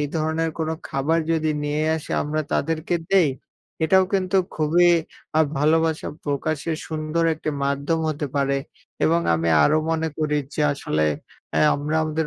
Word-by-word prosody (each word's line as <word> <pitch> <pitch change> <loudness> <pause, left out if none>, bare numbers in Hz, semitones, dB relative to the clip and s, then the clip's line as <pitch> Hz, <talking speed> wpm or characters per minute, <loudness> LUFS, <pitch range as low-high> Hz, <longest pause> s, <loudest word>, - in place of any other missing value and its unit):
এই 145 - 0
ধরনের 160 +1 0
কোনো 160 0 -1 0.2
খাবার 150 +5 +1
যদি 160 -1 +1
নিয়ে 150 +1 -1
আসি 160 - -9
আমরা 155 +1 -1
তাদেরকে 165 +1 0 0.2
দেই 190 -5 +5 0.6
এটাও 190 +3 +5
কিন্তু 190 0 +1 0.2
খুবই 165 +3 +4 0.5
আ - - +6 0.2
ভালোবাসা 160 +2 +2 0.2
প্রকাশের 155 +2 -2
সুন্দর 155 +1 -1
একটি 155 0 -4
মাধ্যম 140 +4 0
হতে 150 -1 -2
পারে 140 0 +1 0.5
এবং 165 +1 +3
আমি 80 0 0
আরও 155 - +4
মনে 160 0 0
করি 150 -1 0 0.2
যে - - -2
আসলে 75 - -1 0.5
অ্যা - - +1
আমরা 150 +2 -2
আমাদের 155 0 -1
155 Hz, 150 wpm, -23 LUFS, 150-165 Hz, 0.6 s, আ